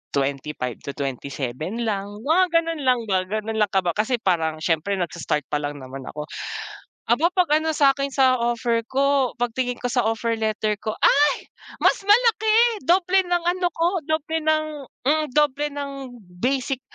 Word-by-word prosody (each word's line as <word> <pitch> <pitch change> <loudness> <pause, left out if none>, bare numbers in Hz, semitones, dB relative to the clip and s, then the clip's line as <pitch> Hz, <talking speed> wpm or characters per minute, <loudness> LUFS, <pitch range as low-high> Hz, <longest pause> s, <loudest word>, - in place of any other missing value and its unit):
25 135 -2 -2
to 140 - -7
27 140 - -4
lang, 200 -3 -2 0.2
mga 335 +5 +4
gano'n 330 -2 +1
lang 250 -1 +4
ba, 190 -2 +1
gano'n 215 +2 -3
lang 210 - +4
kaba 185 -3 +1
kasi 220 +4 +1
parang, 165 -6 0
siyempre 170 +5 0
nags-start 170 -4 -2
pa - - +1
lang 145 0 -4
naman 130 +1 -8
ako. 150 0 -5 0.9
Aba, 310 +9 +3
pag 340 -5 +3
ano 320 0 -1
sakin 275 -1 +3
sa 260 -2 +4
offer 235 -1 0
ko, 275 -1 +2
pagtingin 245 +1 -1
ko - - -6
sa 245 0 +2
offer 225 +1 0
letter 215 -1 0
ko 215 - -2
"Ay! 290 0 +4 0.4
Mas - - +4
malaki!" 445 0 +4
doble 365 +2 +4
ng 350 -1 0
ano 360 0 +1
ko, 330 +1 +1 0.2
doble 315 +1 -1
ng, 310 0 +2 0.4
hmm, 305 +3 +2
doble 295 0 +2
ng 285 -1 -4 0.5
basic 265 0 0
250 Hz, 160 wpm, -23 LUFS, 190-310 Hz, 0.9 s, mga